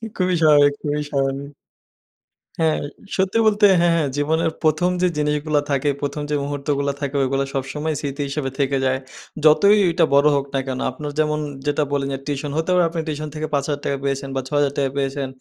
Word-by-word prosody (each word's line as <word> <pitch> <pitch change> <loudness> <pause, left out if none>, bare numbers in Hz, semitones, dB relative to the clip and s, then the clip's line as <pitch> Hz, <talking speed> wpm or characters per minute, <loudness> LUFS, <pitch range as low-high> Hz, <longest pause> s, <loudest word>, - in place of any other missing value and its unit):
খুবই 185 -1 +1
স্বাভাবিক 145 -2 +6
খুবই 150 0 -1
স্বাভাবিক। 140 +1 -2 1.1
হ্যাঁ, 160 -1 +2 0.4
সত্যি 190 +3 +1
বলতে 210 0 +4
হ্যাঁ, 170 0 +3
হ্যাঁ। 150 -4 +1
জীবনের 160 +2 +1
১ম 155 +3 +2
যে 180 - +4
জিনিসগুলা 150 0 +1
থাকে, 140 +1 +1
১ম 145 +1 -3
যে 150 - 0
মুহূর্তগুলো 140 0 -1
থাকে 140 0 -3
ওগুলো 135 +1 0
সবসময় 150 +4 -2
স্মৃতি 140 0 -4
হিসেবে 140 -1 -3
থেকে 135 0 +1
যায়। 130 0 +1 0.5
যতই 200 +7 +6
ওইটা 170 0 +3
বড় 140 +1 +5
হোক 140 0 0
না 135 - +2
কেন? 130 -1 -3
আপনার 145 +3 -6
যেমন 150 0 +1 0.3
যেটা 145 +1 +1
বললেন 140 -1 -1
যে 135 - -4
টিউশন 145 0 -3
হতে 160 +2 -1
পারে 180 -1 +4
আপনি 165 0 -4
টিউশন 155 0 -3
থেকে 155 0 -3
৳৫,০০০ 140 0 -1
পেয়েছেন 135 0 -2
বা 135 - 0
৳৬,০০০ 140 -1 0
পেয়েছেন। 135 0 -1
145 Hz, 180 wpm, -21 LUFS, 140-155 Hz, 1.1 s, স্বাভাবিক